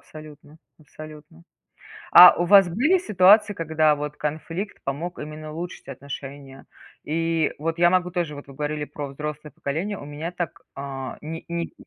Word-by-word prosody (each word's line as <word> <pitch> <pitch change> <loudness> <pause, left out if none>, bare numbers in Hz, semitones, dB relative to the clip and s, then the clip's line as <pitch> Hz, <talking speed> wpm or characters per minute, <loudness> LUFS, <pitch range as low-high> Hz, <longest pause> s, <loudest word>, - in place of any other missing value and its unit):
абсолютно 155 0 -13 0.2
абсолютно. 150 - -13 0.7
А 180 0 +11
у 175 - 0
вас 195 0 +6
были 280 - +2
ситуации 205 - +4
когда 155 -2 +2
вот 150 0 -5
конфликт 165 +6 -5
помог 160 +6 -4
именно 155 0 -8
улучшить 170 +3 -7
отношения 135 0 -9 0.4
и 165 0 0 0.3
Я 175 0 +5
могу 180 -1 +1
тоже 170 -4 -3
вот, 145 - -10
вы - - -11
говорили 150 +1 -3
про 145 0 -7
взрослое 150 +2 -7
поколение. 170 +11 -4
У - - -9
меня 150 +4 -6
так, 175 -3 -5
а, 135 -1 -6
ни 160 +2 -7
ни 170 0 -4
155 Hz, 150 wpm, -23 LUFS, 145-175 Hz, 0.7 s, А